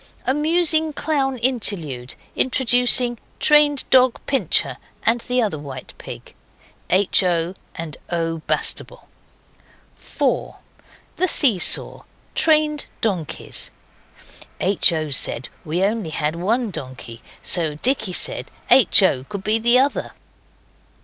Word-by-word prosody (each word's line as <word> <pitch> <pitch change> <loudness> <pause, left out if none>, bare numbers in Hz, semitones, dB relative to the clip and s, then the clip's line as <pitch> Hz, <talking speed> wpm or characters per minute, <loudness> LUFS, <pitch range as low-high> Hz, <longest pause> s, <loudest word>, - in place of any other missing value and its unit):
Amusing 315 +2 +1
clown 275 -3 -2
interlude, 195 - -1 0.2
introducing 245 -2 +2 0.2
trained 295 -2 +3
dog, 255 -2 +4
Pincher, 270 - 0 0.3
and 235 +1 +2
the 250 0 -1
other 195 -9 -3
white 135 -3 -9
pig. - - -11 0.6
H. 190 +2 +3
O. 175 -1 -1 0.2
and 165 -3 -7
O. 165 -1 -3
Bastable. - - -2 0.9
4. - - -3 0.6
The 370 - +1
See 255 - +4
Saw. - - +1 0.3
Trained 305 -2 +2
donkeys. 185 -9 -3 0.9
(H. 190 -1 +3
O. 155 -2 -3
said 130 -2 0
we 155 +2 -4
had 190 +2 +2
only 165 -5 -4
one 230 +2 -1
donkey, 130 -6 -8 0.2
so 160 -4 +3
Dicky 220 - 0
said - - +1 0.2
H. 245 -5 +6
O. 130 -9 +1
could 200 +5 -8
be 215 +2 +1
the 240 +2 +4
other. 275 +2 -1
220 Hz, 115 wpm, -20 LUFS, 165-260 Hz, 0.9 s, H